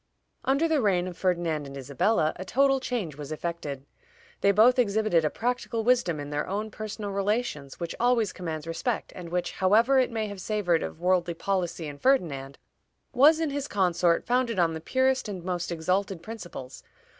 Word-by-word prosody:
Under 275 +5 +2
the 315 -3 +2
reign 185 -4 +2
of 180 - -6
Ferdinand 170 -5 -1
and 140 0 -8
Isabella 155 - +1
a 185 - -5
total 270 +7 +3
change 215 - -3
was 150 0 -7
effected. 155 -4 -4 0.6
"They 200 - +5
both 235 +5 +5
exhibited 215 -6 +2
a 155 - +2
practical 240 0 -2
wisdom 230 -10 +2
in 145 0 -6
their 145 0 -2
own 210 +3 -3
personal 215 -1 -5
relations 200 - -2
which 170 -1 -4
always 240 -4 +2
commands 160 -4 -5
respect, 165 +9 -3
and 175 -2 -8
which, 175 +1 -1
however 225 +8 +4
it 255 - +2
may 225 -2 -2
have 200 -2 -7
savored 185 -5 +1
of - - -5
worldly 175 -1 +1
policy 180 -2 -2
in 145 -1 -8
Ferdinand, 145 - +1 0.6
was 295 +5 +6
in 320 -3 0
his 285 0 -3
consort 175 -3 +2
founded 245 -3 +1
on 170 -2 +2
the 160 - -5
purest 260 +3 +1
and 185 -4 -6
most 180 -1 -3
exalted 180 +2 -1
principles. 175 - -8
190 Hz, 180 wpm, -27 LUFS, 165-235 Hz, 0.6 s, was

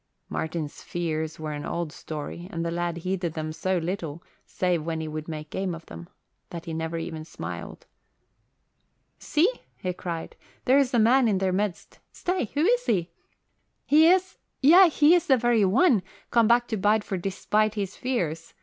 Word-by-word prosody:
Martin's 160 -2 -4
fears 160 -2 -3
were 155 -1 -4
an 145 0 -5
old 170 -3 -3
story 155 +2 -7
and 165 0 -3
the 170 - -1
lad 170 0 -2
heeded 180 -1 -2
them 155 0 -3
so 185 +3 -1
little, 170 -2 -4 0.2
save 180 -4 0
when 165 0 -3
he 160 - -4
would 155 0 -5
make 155 -2 -7
game 190 -3 -2
of 165 - -12
them, 85 0 -10 0.4
that 170 -1 -7
he 165 - -5
never 160 +1 -3
even 160 -1 -5
smiled. 155 - -8 1.3
"See!" 310 +5 +2 0.3
he 180 -1 -3
cried. 170 -2 -6 0.3
"There's 265 0 +4
a - - +4
man 240 +3 +5
in 205 -3 +2
their 190 -1 0
midst. 200 -1 -3
Stay! 360 -5 -1
Who 290 - +2
is - - +2
he? 175 -4 +1 0.7
He 310 +3 +6
is 375 +2 +2 0.2
yea, 345 +6 +8
he 305 +1 +5
is 350 -2 +3
the 265 - +5
very 240 -2 +3
one, 235 - +4 0.3
come 230 -2 +4
back 240 +1 +4
to 220 - -1
Bideford 205 -2 +1
despite 210 +3 0
his 200 -2 -3
fears. 165 -11 -3
185 Hz, 175 wpm, -26 LUFS, 165-240 Hz, 1.3 s, yea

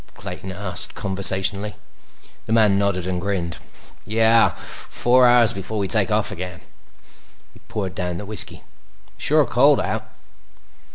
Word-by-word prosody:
Clayton 95 +1 -8
asked 95 -1 +1
conversationally. 100 +1 +1 0.7
The 110 - -1
man 105 -3 +3
nodded 100 -3 -1
and 90 -1 -3
grinned. 90 -4 -3 0.4
"Yeah. 115 +2 +3
Four 125 +1 +1
hours 120 -2 +6
before 100 +3 -6
we 100 -2 -1
take - - +1
off - - +1
again." 90 0 -7 0.9
He - - -18
poured 95 -4 -4
down 90 -1 -4
the 105 - -7
whiskey. 105 +1 -3 0.5
"Sure 150 0 +1
cold 135 +4 +3
out." - - -4
100 Hz, 130 wpm, -21 LUFS, 95-110 Hz, 0.9 s, hours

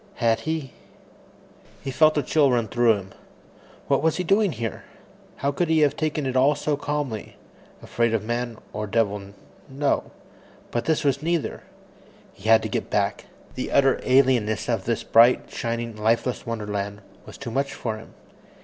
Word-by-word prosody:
Had 115 -2 +2
he 155 -5 -3 1.1
He 135 - -3
felt 155 +2 +4
a 145 - +2
chill 150 -3 +3
run 120 -3 +1
through 120 +1 +3
him. 95 -1 -8 0.8
What - - +2
was 160 0 +1
he 180 - -1
doing 195 +2 +3
here? 115 -2 -5 0.5
How 140 - -1
could 175 +4 0
he 160 -1 +3
have 145 -1 +3
taken 155 -2 -1
it 130 -1 -2
all 135 +3 +4
so 145 +1 -1
calmly. 145 -6 -4 0.5
Afraid 115 -1 0
of 110 - -1
man 120 0 -3 0.2
or 105 0 -3
devil, 105 -2 0 0.5
no 140 +1 0 0.6
but 120 - -2
this 160 -2 +1
was 140 -1 +1
neither. 170 0 -1 0.7
He 100 +3 -5
had 115 0 +6
to - - -1
get - - -3
back. - - 0 0.3
The - - -4
utter 135 -1 +4
alienness 125 -5 +2
of - - -1
this - - -1
bright, 120 +2 +4
shining, 115 -1 -3
lifeless 115 +4 0
wonderland 105 -3 -4 0.3
was - - -10
too 125 -4 -6
much 135 +3 -1
for 110 -2 -3
him. 110 - -14
125 Hz, 165 wpm, -24 LUFS, 115-145 Hz, 1.1 s, had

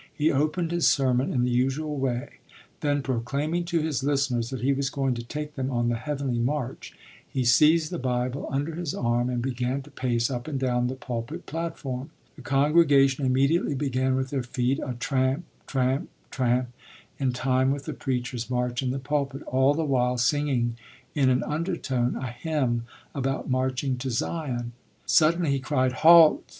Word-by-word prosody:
He 155 +1 +1
opened 155 +4 0
his 170 -1 +2
sermon 130 -1 +2
in 125 - +1
the 125 - +1
usual 135 +5 0
way; 130 -3 -3 0.4
then, 145 -1 0
proclaiming 140 +7 -1
to 170 -2 0
his 150 -4 -1
listeners 135 -5 0
that 130 - -5
he 135 +3 +2
was 135 0 -1
going 135 -2 0
to 120 - -4
take 150 +5 -5
them 130 -2 -3
on 120 -2 0
the 120 - +1
heavenly 135 -1 -2
march, 130 +1 -3 0.3
he 130 - -1
seized 155 +7 +5
the 175 - -3
Bible 125 +1 -2
under 145 +4 -1
his 170 -2 -3
arm 120 +1 0
and 120 -1 -2
began 130 +1 -2
to 145 - -16
pace 120 -1 0
up 125 +1 -4
and 145 -3 -2
down 125 -2 +1
the 130 - -3
pulpit 130 +6 -5
platform. 145 -5 -4 0.3
The 140 - -12
congregation 140 -1 +3
immediately 140 +4 +2
began 130 -1 0
with 130 0 -2
their 135 -2 0
feet 125 +2 -1
a 130 -3 -4
tramp, 130 +5 0 0.2
tramp, 130 0 0 0.2
tramp, 125 -1 +1 0.5
in 135 -2 +1
time 130 +1 +1
with 140 0 -2
the - - -4
preacher's 125 -2 -3
march 125 0 -1
in 130 - -1
the 130 - -1
pulpit, 140 0 -2
all 130 +2 +2
the 165 - 0
while 125 -3 +1
singing 125 -2 +1 0.4
in 135 -3 +3
an 125 0 +2
undertone 150 -6 -1
a 130 -2 -4
hymn 120 -3 -1 0.3
about 135 -1 -2
marching 130 0 0
to 130 +1 -3
Zion. 120 -2 -2 0.3
Suddenly 165 0 +3
he 140 - +1
cried: 130 -1 +1
"Halt!" 160 +4 +7
135 Hz, 175 wpm, -26 LUFS, 125-145 Hz, 0.5 s, Halt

